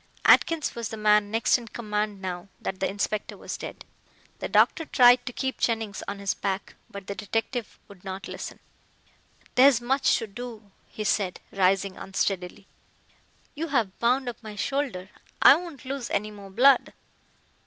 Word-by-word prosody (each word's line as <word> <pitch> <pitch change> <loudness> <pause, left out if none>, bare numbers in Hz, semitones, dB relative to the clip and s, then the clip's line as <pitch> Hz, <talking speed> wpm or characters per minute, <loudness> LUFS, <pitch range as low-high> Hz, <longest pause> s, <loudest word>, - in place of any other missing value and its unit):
Atkins 330 -3 +4
was 235 -2 -4
the 220 - -6
man 210 -1 +3
next 225 +3 +2
in 235 - -11
command 210 -3 -3
now 180 0 -4
that 190 - -4
the 190 - 0
inspector 205 +1 -3
was - - -6
dead. - - -8 0.5
The - - -4
doctor 325 - +4
tried 245 -4 +5
to - - -2
keep 265 +2 -3
Jennings 225 -3 -1
on 200 - -4
his 200 -1 -1
back, 195 -1 -3 0.2
but 200 -1 -9
the 200 - -4
detective 225 +3 -3
would 200 -3 -16
not 190 0 -6
listen. - - -7 1.0
"There 255 +2 +7
is 265 -5 +4
much 265 +3 +2
to - - -4
do," 220 -1 -9 0.2
he 215 - -5
said, 195 -3 0
rising 195 0 +1
unsteadily. 195 0 -3 0.9
"You 325 +2 -4
have 230 - -1
bound 250 +2 +2
up 240 -1 -5
my 215 -2 -9
shoulder. 210 -5 -2 0.3
I - - +9
won't 330 -5 -8
lose 260 -2 -4
any 210 +1 -1
more 200 -2 -11
blood." 250 +6 +4
215 Hz, 165 wpm, -26 LUFS, 195-245 Hz, 1.0 s, I